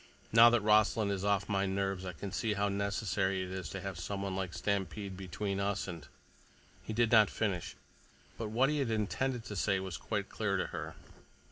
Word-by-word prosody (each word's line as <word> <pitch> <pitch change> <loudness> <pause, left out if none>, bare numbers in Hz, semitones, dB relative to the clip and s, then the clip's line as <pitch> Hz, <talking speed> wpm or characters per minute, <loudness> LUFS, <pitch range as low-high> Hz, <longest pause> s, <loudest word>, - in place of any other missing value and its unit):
Now 115 +1 +9
that 120 -1 +3
Rossland 105 0 +3
is 100 -1 -2
off 100 -1 +1
my 100 -1 +1
nerves, 95 -1 -1
I 90 - -4
can 95 +4 -6
see 110 +2 0
how 100 0 +1
necessary 100 -1 0
it 90 - -6
is 95 -1 -4
to 95 - -5
have 95 -3 -5
someone 100 +1 -3
like 95 -2 -2
Stampede 100 0 -2
between 95 +2 -3
us 100 0 -1
and—" 85 -5 -7 0.7
He - - -7
did 115 +1 +2
not 110 -3 +7
finish, 100 -6 -2 0.6
but 110 -2 -4
what 125 +6 +3
he 150 - 0
had 135 -4 0
intended 115 +3 -1
to 105 - -6
say 95 0 +1
was 95 -4 -5
quite - - -3
clear - - -1
to - - 0
her. - - -5
100 Hz, 200 wpm, -33 LUFS, 95-110 Hz, 0.7 s, Now